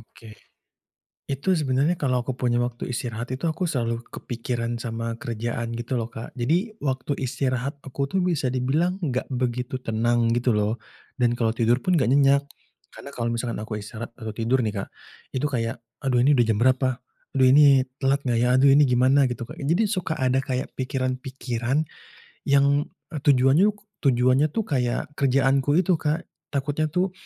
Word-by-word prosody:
Oke. 115 0 -15 0.9
Itu 140 +7 0
sebenarnya 145 +3 +1
kalau 130 -5 0
aku 125 +1 -4
punya 120 -1 0
waktu 120 +1 -3
istirahat 120 0 -4
itu 130 +6 -2
aku 160 +3 -2
selalu 120 -7 -1
kepikiran 120 -1 -4
sama 115 -1 -4
kerjaan 115 -2 -4
gitu 120 +2 -3
loh 115 -1 -3
Kak, 115 - -9
jadi 170 - 0
waktu 135 +1 -1
istirahat 130 +1 -2
aku 140 0 -4
tuh 190 - +1
bisa 165 -8 0
dibilang 155 +9 0
gak 130 +1 -3
begitu 125 0 -2
tenang 115 0 +1
gitu 120 0 +1
loh, 105 +2 0 0.3
dan 120 -1 +2
kalau 115 -1 0
tidur 120 +2 +2
pun 185 +4 +1
gak 130 -5 +2
nyenyak, 140 0 +4 0.5
karena 140 - -10
kalau 115 -1 -1
misalkan 115 0 -2
aku 105 -1 -5
istirahat 115 +3 -8
atau 110 -2 -6
tidur 120 +4 +1
nih 105 -4 -1
Kak, - - -9 0.4
itu 135 +3 -1
kayak, 115 -4 -2 0.2
"Aduh 130 -2 +2
ini 140 +4 +4
udah 120 - +4
jam 105 - 0
berapa? 130 0 +2 0.3
Aduh 130 -1 +4
ini 135 -1 +6 0.2
telat 135 +1 +3
gak 120 -1 +2
ya? - - +3
Aduh 140 - +5
ini 150 - +6
gimana?" 130 +2 +4
gitu 120 -1 -5
Kak, - - -9
jadi 170 +10 +2
suka 185 -6 -2
ada 130 +1 +2
kayak 130 0 -3
pikiran-pikiran 130 +1 -2 0.6
yang, 140 +1 +3 0.2
eee, 155 - -4
tujuannya 140 +6 +4 0.3
tujuannya 130 +2 +3
tuh 220 +9 -2
kayak 130 - -1
kerjaanku 135 +1 +2
itu 180 -1 +2
Kak, 155 +2 -1 0.3
takutnya 145 +3 0
tuh 180 +4 0
130 Hz, 170 wpm, -24 LUFS, 120-140 Hz, 0.9 s, ini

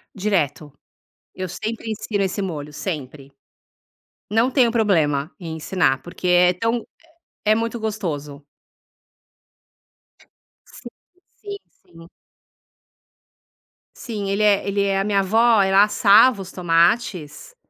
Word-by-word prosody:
Direto. 165 -7 -1 0.6
Eu 185 -1 -5
sempre 220 +5 -5
ensino 215 -2 -2
esse 190 +1 -3
molho 150 -5 -5
sempre. 145 -4 -6 1.0
Não 225 +4 +2
tenho 250 -3 +3
problema 160 -10 +1
em 165 -2 -6
ensinar, 150 -5 0
porque 175 +3 -8
é 180 0 +5
tão 230 +4 -2 0.6
é 215 0 +4
muito 230 +1 -3
gostoso. 155 -10 -5 2.2
Sim - - -12 0.5
sim 405 -1 -7 0.2
sim. 165 0 -17 1.9
Sim, 210 -4 -6
ele 200 +2 -1
é 205 -2 +2
ele 200 0 0
é 195 -1 0
a - - 0
minha 200 -1 +1
avó, 220 +3 +3
ela 195 +1 +5
assava 210 +1 +4
os 190 - -9
tomates 175 - 0
195 Hz, 110 wpm, -21 LUFS, 165-220 Hz, 2.2 s, é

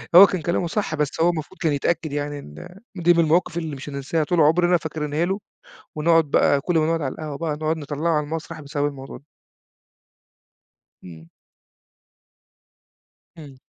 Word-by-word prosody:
هو 190 - +12
كان 185 - -3
كلامه 170 +2 -1
صح، 180 -4 -2
بس 150 +1 -2
هو 170 - +5
المفروض 170 +2 -4
كان 160 -4 +1
يتأكد 160 +2 -1
يعني 145 0 -3
إن 175 - -12 0.2
دي 175 -1 +4
من 170 - +1
المواقف 170 +1 +2
اللي 160 -3 -3
مش 135 +2 -8
هننساها 140 +3 -2
طول 170 +2 +1
عُمرنا، 175 +3 +4
فاكرينها 155 0 -2
له 195 +3 -2 0.6
ونقعد 165 +1 +3
بقى 140 -1 +3
كل 175 +3 0
ما 155 - +3
نقعد 165 -1 0
على 135 - -2
القهوة 150 -3 -6
بقى 160 -2 -2
نقعد 155 +1 -1
نطلّعه 150 +2 -2
على 150 - 0
المسرح 160 +1 -6
بسبب 145 0 -2
الموضوع 135 -2 -8
ده. - - -20 1.8
إمم. 80 -2 -12 2.1
إمم. 140 -4 -12
155 Hz, 165 wpm, -23 LUFS, 145-170 Hz, 2.1 s, هو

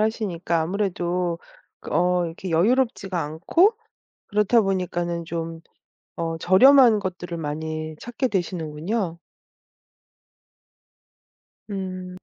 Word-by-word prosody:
하시니까 185 -7 0
아무래도 175 -1 -1 0.5
어 180 0 +2
이렇게 170 +3 -6
여유롭지가 195 0 +1
않고 180 - +2 0.5
그렇다 210 +3 +3
보니까는 175 -3 -1
좀 165 0 -5 0.6
어 165 0 -2
저렴한 235 +6 +6
것들을 175 -3 -5
많이 155 +1 -4
찾게 240 +2 -2
되시는군요. 175 0 -2 2.5
음. 185 -2 -5
180 Hz, 215 characters per minute, -24 LUFS, 165-205 Hz, 2.5 s, 저렴한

